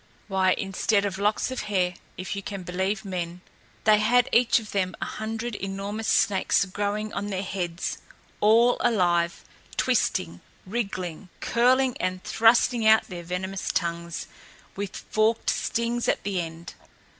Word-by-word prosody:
Why, 190 -2 +3
instead 200 +1 0
of 195 -1 -3
locks 210 +5 +1
of 260 - -4
hair, 180 -3 +1 0.2
if 185 +2 -4
you 200 - -4
can 195 -1 -6
believe 190 +4 -2
men, 180 -2 -4 0.4
they 210 -1 +5
had 245 +3 +4
each 240 0 +5
of 220 -3 -5
them 185 -3 -1
a - - -2
hundred 225 +2 -4
enormous 200 +2 -4
snakes 200 0 +3
growing 205 +2 -3
on 205 - -3
their 195 -1 -2
heads, 180 -2 -3 0.4
all 230 +3 +5
alive, 175 -6 +1 0.3
twisting, 85 0 0 0.2
wriggling, 185 -4 -4
curling 255 +2 +3
and 185 0 -2
thrusting 230 0 +4
out 220 0 +5
their 175 -2 -6
venomous 185 +2 -3
tongues, 170 0 -2 0.5
with 200 -1 -4
forked 220 +1 +2
stings 235 +1 -1
at - - +1
the 195 -2 -1
end! 165 0 -8
200 Hz, 145 wpm, -26 LUFS, 185-220 Hz, 0.5 s, they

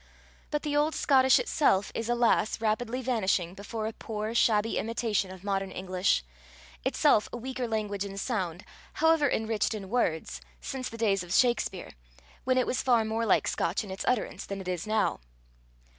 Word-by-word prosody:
But 295 - -2
the 295 -1 -1
old 300 +2 +2
Scotish 265 -2 +5
itself 280 - +2
is, 230 0 -3
alas! 235 -2 +2
rapidly 230 +3 -1
vanishing 190 -8 0
before 205 +3 -5
a 220 - -3
poor, 215 0 -4
shabby 225 -1 +2
imitation 220 -4 -1
of 185 0 -11
modern 195 -1 -1
English 185 - 0 0.6
itself 210 - +3
a - - -5
weaker 255 0 -4
language 210 -3 -2
in 195 -1 -7
sound, 190 -6 -3 0.3
however 320 -2 +3
enriched 220 -1 0
in 195 -3 -7
words, 185 -9 -1 0.2
since 260 -2 -5
the 230 - -9
days 200 -4 +2
of 175 -1 -8
Shakspere, 235 -5 +1 0.5
when 255 0 +2
it 255 - +3
was 250 - -1
far 240 -4 +3
more 225 +1 -1
like - - +3
Scotch 175 +6 0
in 200 - -8
its 190 - -4
utterance 250 -4 -1
than 200 0 -5
it 190 - -8
is 180 +2 -3
now. 215 0 +1
220 Hz, 175 wpm, -29 LUFS, 195-245 Hz, 0.6 s, Scotish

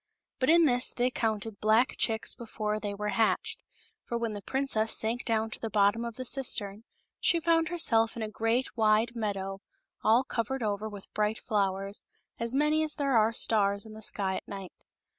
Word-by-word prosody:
But 255 - +1
in 335 0 +6
this 245 -3 +3
they 250 +1 +1
counted 220 -3 -2
black 220 +4 +3
chicks 220 -1 0
before 215 -2 -3
they 205 -1 -4
were 210 +1 -3
hatched; 220 +1 0 0.4
for 235 - -3
when 230 -2 -2
the 205 - -6
princess 225 -2 +1
sank 230 +3 -2
down 225 -1 0
to - - -1
the 225 - -4
bottom 205 +2 +2
of 235 -1 -6
the 255 0 -6
cistern, 225 -5 -1 0.3
she 340 - +2
found 330 -1 +2
herself 230 -10 +2
in 225 - -3
a - - -2
great 225 +4 -1
wide 220 +1 +2
meadow, 195 -3 -3 0.4
all 230 +4 +4
covered 245 +1 -3
over 210 0 -2
with 205 -2 -11
bright 210 +1 0
flowers, 195 -2 -2 0.3
as 235 0 -1
n^any 300 +3 +2
as 310 -1 +2
there 275 -3 0
are 220 0 +4
stars 200 -3 +1
in 220 - -11
the 220 - -10
sky 195 -3 -2
at - - -9
night. 195 -3 -8
225 Hz, 190 wpm, -29 LUFS, 210-245 Hz, 0.4 s, in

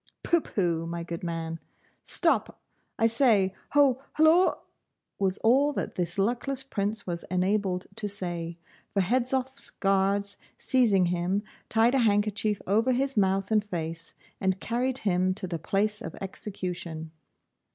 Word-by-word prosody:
'Pooh, 340 -1 +3
pooh, 170 - -1
my 170 0 -4
good 170 0 -6
man! 165 -1 -4 0.4
Stop, - - +1 0.4
I 225 - +2
say, 225 -5 +3 0.2
ho! 275 -3 +4
hulloa!' 320 +4 +5 0.6
was 190 -1 +1
all 275 +6 +4
that - - -3
this 175 0 -2
luckless 245 +6 0
Prince 210 -4 -2
was 170 -1 -3
enabled 185 0 0
to 210 -1 -1
say, 175 -4 -4 0.3
for 195 - 0
Hedzoff's 255 +5 0
guards 195 +1 +1 0.2
seizing 220 -8 +4
him, 180 +4 0 0.3
tied 225 +3 +4
a 270 - +3
handkerchief 210 -1 +1
over 225 +6 +2
his 270 +2 0
mouth 195 0 +1
and 215 -1 +3
face, 165 -4 -5 0.2
and 190 -1 0
carried 250 +4 -1
him 185 -4 +1
to 205 - -1
the 170 -2 -4
place 210 +4 0
of - - -7
execution. 180 -5 -5
200 Hz, 140 wpm, -27 LUFS, 180-235 Hz, 0.6 s, hulloa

